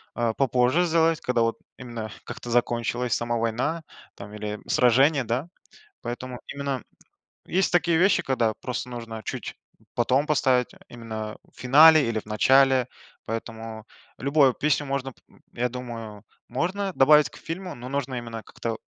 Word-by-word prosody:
а, 120 -2 0
попозже 130 +5 +2
сделать, 165 -1 +2
когда 125 -2 0
вот 115 0 +1 0.2
именно 120 -3 -6 0.2
как-то 120 - -8
закончилась 120 0 0
сама 120 +2 -1
война 125 +9 -1 0.3
там 100 +1 -10
или 105 0 -5
сражение, 135 +4 +4
да. 125 +7 -2 0.5
Поэтому 125 +1 -6
именно 140 -2 -4 0.6
есть 190 +1 +1
такие 175 -1 +3
вещи, 185 +4 +4
когда 115 -4 +1
просто 125 0 -5
нужно 115 -2 -7
чуть - - -5 0.4
потом 130 +5 +2
поставить, 130 -5 +2 0.2
именно 110 -2 -6
в - - -29
финале 150 +3 +7
или 110 -1 -1
в - - -14
начале. 130 +4 +4 0.4
Поэтому 115 -1 -6 0.3
любое 140 0 +4
песню 150 +1 0
можно, 135 -1 -3
п - - -29 0.3
я 125 +1 -1
думаю, 115 -4 -7 0.3
можно 190 +9 -1
добавить 150 +1 +5
к - - -15
фильму, 180 +2 -6
но 120 +1 -9
нужно 135 -1 -2
именно 115 -2 -6
как-то 115 -1 -5
125 Hz, 145 wpm, -25 LUFS, 115-140 Hz, 0.6 s, финале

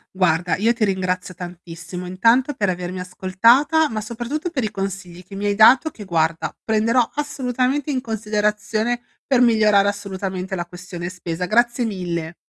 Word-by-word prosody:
Guarda, 175 -1 +2
io 225 +5 +2
ti 230 -2 -2
ringrazio 185 -1 -2
tantissimo, 175 0 -8
intanto 230 +9 +3
per 205 -3 0
avermi 180 0 -4
ascoltata, 230 - +3
ma 215 -1 -3
soprattutto 240 +10 -4
per 265 -8 -2
i 215 - -2
consigli 190 -3 -5
che 195 +2 -12
mi 205 +1 -4
hai 205 - +2
dato, 255 +8 +6
che 210 - -10
guarda, 165 -2 0
prenderò 225 +2 +2
assolutamente 275 0 -1
in 255 -2 -1
considerazione 215 +1 -1 0.3
per 260 -3 +3
migliorare 215 -4 +4
assolutamente 190 -2 -4
la 175 -1 -3
questione 175 0 -7
spesa. 180 -1 -4
Grazie 240 +4 +2
mille. 175 -5 -4
205 Hz, 155 wpm, -21 LUFS, 180-235 Hz, 0.3 s, dato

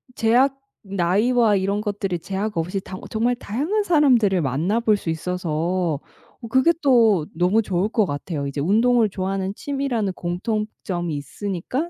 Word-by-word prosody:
제약 255 +5 +3 0.2
나이와 205 +4 +2
이런 195 +1 0
것들이 200 -3 -2
제약 195 +3 -4
없이 180 +4 -1
다 185 - -8
정말 235 +3 +1
다양한 295 - -1
사람들을 250 - +3
만나 155 - 0
볼 220 -3 +2
수 180 - -5
있어서 170 -1 -1 0.4
어 230 - -7
그게 260 +8 +4
또 230 - +4
너무 180 +6 +3
좋을 190 -2 0
것 220 -2 +2
같아요. 145 -1 -4
이제 140 +1 -4
운동을 225 +7 +3
좋아하는 190 0 -2
취미라는 265 -9 -2
공통점이 180 -2 -3
있으니까 200 - -4
200 Hz, 325 characters per minute, -22 LUFS, 175-235 Hz, 0.4 s, 그게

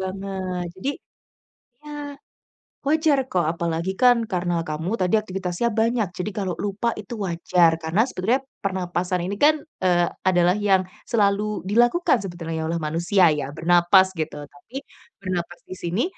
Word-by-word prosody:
banget. 190 -1 -4
Jadi, 225 +9 -2 0.9
ya, 295 -1 -7 0.7
wajar 305 0 +3
kok 185 -9 0
apalagi 170 +3 -2
kan 245 -3 +4
karena 175 -2 -1
kamu 160 +5 -3
tadi 185 +4 +3
aktivitasnya 190 +1 -2
banyak. 225 -2 +1
Jadi 180 +4 -3
kalau 190 -3 -2
lupa 205 +3 -1
itu 215 +2 -7
wajar. 170 -1 +2
karena 175 +9 +2
sebenarnya 250 +3 -1 0.2
pernapasan 180 -2 -2
ini 200 +2 -3
kan, 305 +1 +6 0.2
eee, 175 -2 +3 0.2
adalah 180 -1 +4
yang 195 -3 +2 0.2
selalu 210 -2 +1
dilakukan 240 - +3
sebetulnya 165 -4 -4
oleh 165 +1 -1
manusia 170 +3 +3
ya, 145 -2 -3
bernapas 175 +3 +4
gitu. 150 -2 -4
Tapi 185 - -10 0.4
bernapas 175 -2 -4
di - - -8
sini 185 +6 -2
185 Hz, 135 wpm, -23 LUFS, 175-215 Hz, 0.9 s, kan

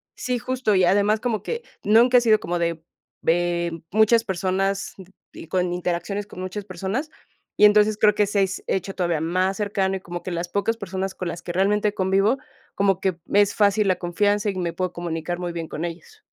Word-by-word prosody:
sí, 250 -1 -2
justo, 245 -4 0
y 185 - +4
además 205 +4 +3
como 225 -4 -2
que 470 0 -4 0.2
nunca 235 +4 +5
he - - +5
sido 215 -2 +4
como 175 +1 -3
de 170 -1 -2 0.4
ve 175 0 +1
m 165 -1 -7
muchas 220 +2 +4
personas 195 +1 -1 0.4
y - - -10
con 180 -1 0
interacciones 180 +3 -3
con 185 - -11
muchas 190 +2 -5
personas, 195 - -3 0.5
y 210 - +7
entonces 210 0 +5
creo 210 -1 +4
que 210 - +3
se 200 -1 +1
s 185 -1 -3
hecho 195 +1 -2
todavía 175 -4 0
más 185 +3 0
cercano 195 -2 0
y - - -9
como 175 -1 -7
que 185 - -5
las 170 +1 -3
pocas 205 +5 -1
personas 190 -2 -4
con 180 - -5
las 170 0 -5
que 175 - -5
realmente 205 +3 +1
convivo, 195 +6 +2 0.4
como 195 -2 +1
que 185 -3 0
me 205 - +3
es 205 - +2
fácil 205 0 +3
la 185 - +2
confianza 205 +4 0
y 195 - -3
me 175 -2 -2
puedo 185 0 -3
comunicar 170 0 -4
muy 175 -1 -3
bien 165 -1 -5
con 155 - -5
ellos. 180 - -9
195 Hz, 210 wpm, -23 LUFS, 175-210 Hz, 0.5 s, y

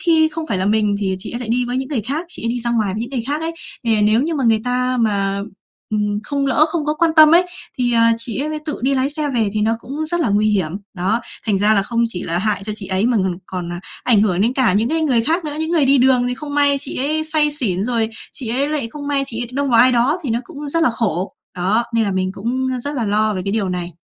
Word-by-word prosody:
khi 320 -2 +3
không 315 +1 -6
phải 195 - -1
là 190 - -1
mình 210 -1 +2
thì 190 -2 -1
chị - - -4
ấy 240 - -5
lại 230 - -6
đi 245 +2 +1
với 245 +1 -3
những 265 +1 -3
người 275 -7 -1
khác, 280 - -2
chị - - -4
ấy 230 - 0
đi 240 +1 -2
ra 235 0 -2
ngoài 215 -5 0
với 215 - -4
những 240 +3 -5
người 255 -4 -2
khác 295 +2 -1
ấy. 325 +1 -3 0.3
Thì, 225 - +2
à, 215 - +1
nếu 215 +4 +3
như 325 +2 -2
mà 275 - -1
người 225 -2 +3
ta 250 +1 0
mà, 200 -3 0 0.5
ừm, 210 -1 -1
không 280 +1 -2
lỡ 290 +3 +4
không 315 -2 -2
có 300 - 0
quan 330 +1 +2
tâm 310 +1 +8
ấy, 360 +1 +5 0.3
thì, 245 -1 +1
à, 230 0 +4
chị 230 +1 0
ấy 305 +1 -3
tự 300 - -4
đi 275 +2 +2
lái 265 +1 +1
xe 300 -1 -2
về 220 -3 +1
thì 215 - -1
nó 220 +2 +2
cũng 285 +7 -5
rất 345 +1 +1
là 300 - +1
nguy 205 +1 +2
hiểm. 190 -7 0 0.2
Đó, 195 +6 0 0.3
thành 200 -3 +2
ra 210 +2 +4
là 200 - +3
không 235 +3 -1
chỉ 185 -6 -2
là 170 +1 0
hại 205 0 -1
cho 215 - +1
chị 205 -3 0
ấy 190 +4 +1
mà 245 -2 +2
ng 185 -3 -1
còn, 175 -2 -5
à, 175 - -6 0.2
ảnh 225 -5 +4
hưởng 185 -4 +1
đến 230 +4 +2
cả 260 -7 +2
những 215 +5 +1
cái 325 +1 0
người 250 -7 +2
khác 330 +7 0
nữa. 300 -1 -4
Những 320 +1 -2
người 320 -5 +3
đi 275 0 +4
đường 250 -1 +4
thì 250 - -2
không 290 +2 -7
may 285 -1 +5
chị 275 0 -2
ấy 305 +4 0
say 305 -1 +3
xỉn, 210 -10 0
rồi 230 -2 0 0.2
chị 245 -5 -1
ấy 275 +5 +1
lại 290 -7 -2
không 290 -1 -7
may 280 -1 +1
chị 235 -2 -3
ấy - - -4
đông 280 0 -1
vào 230 - +5
ai 255 +1 +5
đó 255 +8 +2
thì 270 - -3
nó 235 +2 0
cũng 295 -4 -8
rất 330 +3 +3
là 285 - +3
khổ. 200 -6 -2 0.2
Đó, 205 +6 +2
nên 225 -1 +2
là 200 - -1
mình 185 0 -1
cũng, 250 +6 -2
a, 255 - -2
rất 285 +4 -4
là 245 -5 -1
lo 210 +1 +1
về 185 - -3
cái 200 - -2
điều 205 -4 0
này. 180 -1 -4
240 Hz, 305 wpm, -19 LUFS, 210-285 Hz, 0.5 s, tâm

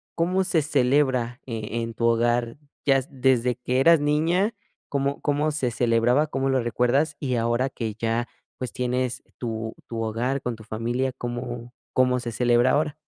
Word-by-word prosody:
cómo 180 +3 +1
se 175 -4 +2
celebra, 130 -3 +1
eh, 115 -1 -4
en 115 0 -5
tu 115 - -1
hogar? 120 +1 +2 0.3
Ya 135 -1 +5
desde 125 -3 +2
que 125 +1 -1
eras 165 +2 +6
niña, 165 +8 +2 0.4
¿cómo 140 0 -1
cómo 145 +1 +1
se 130 -5 -1
celebraba? 120 +5 +2
¿Cómo 135 -2 -1
lo 130 -2 +2
recuerdas? 125 +6 +1
Y 130 -3 -1
ahora 120 +3 +1
que 110 -4 -4
ya, 115 +2 -1 0.3
pues, 125 - -5
tienes 125 0 -1
tu 110 -2 -4
tu 115 -1 -4
hogar 120 +5 -1
con 125 -2 -3
tu 110 - -12
familia 120 +4 -2
¿cómo 120 -1 -5 0.2
cómo 125 0 +3
se 120 -1 -4
celebra 120 +1 +3
ahora? 150 0 +1
125 Hz, 165 wpm, -25 LUFS, 120-140 Hz, 0.4 s, eras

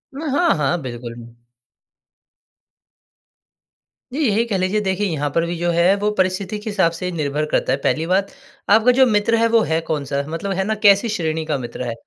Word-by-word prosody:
उम, 280 - -6
हाँ, 350 +3 +3
हाँ। 155 +4 0
बिल्कुल। 120 -2 -7 3.0
जी, 285 - -3
यही 215 +2 +2
कह 215 -5 -1
लीजिए 185 +3 0
देखिए 195 +1 -1
यहाँ 150 -4 -2
पर 165 +3 +1
भी 170 +1 -3
जो 175 +1 -1
है 170 +3 +3
वो 205 +1 -1
परिस्थिति 185 +2 -1
के 210 - -6
हिसाब 190 -5 +2
से 175 +2 -5
निर्भर 150 -2 -2
करता - - +1
है। - - 0
पहली 160 +1 0
बात 190 +2 +1 0.4
आपका 220 +4 +5
जो 260 +1 +5
मित्र 215 -1 +2
है 230 0 +3
वो 230 0 +3
है 160 -3 0
कौन-सा? 140 -2 -1
मतलब 165 +5 -4
है 190 - +1
ना, 215 +2 -1
कैसी 205 +1 +4
श्रेणी 160 -6 -2
का 155 -2 -1
मित्र 125 0 -6
है? 120 - -3
185 Hz, 195 wpm, -20 LUFS, 155-210 Hz, 3.0 s, आपका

